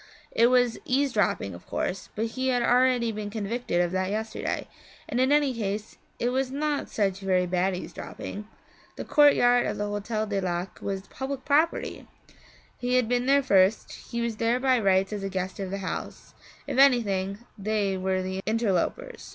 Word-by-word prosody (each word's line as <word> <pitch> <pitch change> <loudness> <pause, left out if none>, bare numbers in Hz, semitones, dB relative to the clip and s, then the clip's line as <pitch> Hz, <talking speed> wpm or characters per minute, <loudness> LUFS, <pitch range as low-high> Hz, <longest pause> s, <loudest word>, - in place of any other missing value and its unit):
It 230 - +4
was 245 -2 +3
eavesdropping 250 - +1
of 85 - -12
course, 190 - -3
but 220 - -1
he 260 0 -2
had 245 -2 +2
already 245 -1 +3
been 210 -1 -5
convicted 215 -3 -1
of 175 -1 0
that 185 0 -1
yesterday, 220 +2 -3 0.4
and 240 - -2
in 260 +2 +3
any 290 -2 +3
case 210 -2 -4 0.2
it 240 - 0
was 260 +1 0
not 290 +1 -2
such 195 -3 0
very 185 -2 +1
bad 180 +1 0
eavesdropping. 205 +3 -7 0.5
The - - -6
courtyard 245 -5 +5
of - - -3
the 205 - -1
Hotel 210 +1 -2
du 200 -2 -2
Lac 180 0 -3
was 195 -1 -4
public 265 0 -5
property; 305 +4 +1 0.7
he 250 0 0
had 250 -3 +3
been 245 +1 0
there 280 +1 +4
first, 195 -4 +3
he 235 - -6
was 235 -2 -2
there 230 +2 +1
by 260 -1 +3
rights 195 -1 +2
as 205 - -3
a 195 - -3
guest 190 0 -4
of 195 -1 -3
the 195 - -3
house; - - -6 0.3
if - - -2
anything, 200 -8 +3 0.2
they 205 -1 -1
were 185 0 -1
the 190 +1 -3
interlopers. 230 - -1
220 Hz, 175 wpm, -27 LUFS, 195-250 Hz, 0.7 s, courtyard